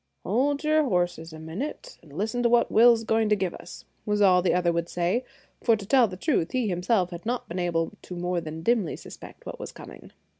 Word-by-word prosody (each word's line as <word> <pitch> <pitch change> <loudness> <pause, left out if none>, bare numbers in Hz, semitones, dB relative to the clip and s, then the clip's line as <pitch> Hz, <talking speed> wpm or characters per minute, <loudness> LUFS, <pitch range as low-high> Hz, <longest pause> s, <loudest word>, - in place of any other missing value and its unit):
"Hold 275 - 0
your 310 0 +3
horses 175 - -1
a 160 - -9
minute, 165 - -6
and 155 - -18
listen 220 +4 -1
to 240 - +3
what 240 0 +3
Will's 230 0 +6
going 220 -1 +1
to 210 - +4
give 185 -3 -2
us," - - -11 0.2
was 210 0 0
all 185 -3 +5
the 180 - +2
other 175 -1 +2
would 170 0 -2
say; 180 +8 0 0.4
for, 230 - +4
to 205 -2 -7
tell 250 +2 +4
the 185 -2 -8
truth, 190 - 0
he 255 -3 +1
himself 180 0 +1
had 170 0 -7
not 245 +2 -3
been 175 +2 -4
able 170 -2 0
to 180 - -8
more 175 0 -1
than 160 0 -7
dimly 220 -5 +1
suspect - - -12
what - - -7
was - - -7
coming. - - -12
190 Hz, 225 wpm, -26 LUFS, 175-235 Hz, 0.4 s, Will's